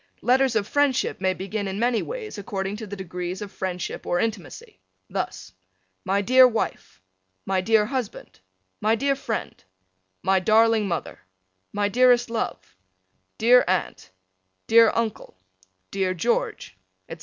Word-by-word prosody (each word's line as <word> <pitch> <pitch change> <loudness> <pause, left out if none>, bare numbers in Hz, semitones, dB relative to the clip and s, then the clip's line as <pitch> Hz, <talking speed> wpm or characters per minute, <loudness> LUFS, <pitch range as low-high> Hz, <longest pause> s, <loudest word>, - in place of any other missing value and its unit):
Letters 255 0 +3
of 210 -2 0
friendship 285 -7 +1
may 185 -1 +1
begin 200 +2 -4
in 190 0 -4
many 235 +1 +1
ways 460 - -6
according 195 -2 -4
to 220 -1 -7
the 205 - -6
degrees 180 -1 -5
of 205 -2 -7
friendship 185 -2 -5
or 175 - +1
intimacy. 185 - -5 0.3
Thus: 95 - -5 0.5
My 200 +1 +1
dear 255 +4 +7
Wife: 225 - -4 0.4
My 190 -1 0
dear 215 +2 +3
Husband: 250 - -5 0.4
My 220 +1 +3
dear 275 +4 0
Friend: 235 -5 -5 0.6
My 190 0 +3
darling 220 +1 +3
Mother: 170 -3 -4 0.5
My 205 0 0
dearest 245 +1 +3
Love: 95 - -4 0.6
Dear 245 +3 +6
Aunt: 180 - -2 0.6
Dear 230 0 +6
Uncle: 225 - -3 0.5
Dear 190 -1 -1
George: 420 - -2 0.3
etc. - - -9
215 Hz, 135 wpm, -24 LUFS, 190-240 Hz, 0.6 s, dear